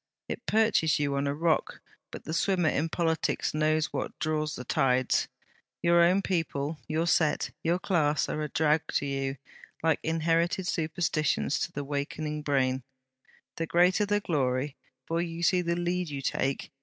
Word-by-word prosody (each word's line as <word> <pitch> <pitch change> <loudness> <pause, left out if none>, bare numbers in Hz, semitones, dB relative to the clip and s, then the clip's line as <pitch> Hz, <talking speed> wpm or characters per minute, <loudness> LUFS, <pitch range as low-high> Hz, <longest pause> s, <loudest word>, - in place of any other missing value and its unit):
It - - -5
perches 215 -8 +3
you 145 -1 0
on 140 +1 0
a 140 - 0
rock; 165 +1 0 0.3
but - - -9
the 160 - -5
swimmer 175 -1 +2
in 160 +2 0
politics 165 -2 0
knows 155 0 +1
what - - -3
draws 155 -1 -1
the 125 - -6
tides. 130 -1 +2 0.6
Your 170 0 +5
own 180 +3 +4
people, 160 -4 -2
your 160 +2 0
set, 160 -3 +2
your 170 +2 +1
class, 155 -6 +1
are 155 - -3
a 150 - -3
drag 155 +1 +2
to - - +1
you, 135 -1 -2 0.5
like 160 -2 +3
inherited 165 +3 +1
superstitions 155 -4 0
to - - -2
the 145 - -4
wakening 150 +2 -3
brain. 130 -3 +1 0.8
The 165 - -2
greater 180 +5 +3
the 205 0 +2
glory! 135 -5 -1 0.3
For 165 +1 -1
you 170 0 -4
see 180 +1 +3
the 170 -1 -1
lead 175 0 -1
you 140 -2 -5
take? 135 +1 -1
155 Hz, 165 wpm, -28 LUFS, 145-170 Hz, 0.8 s, Your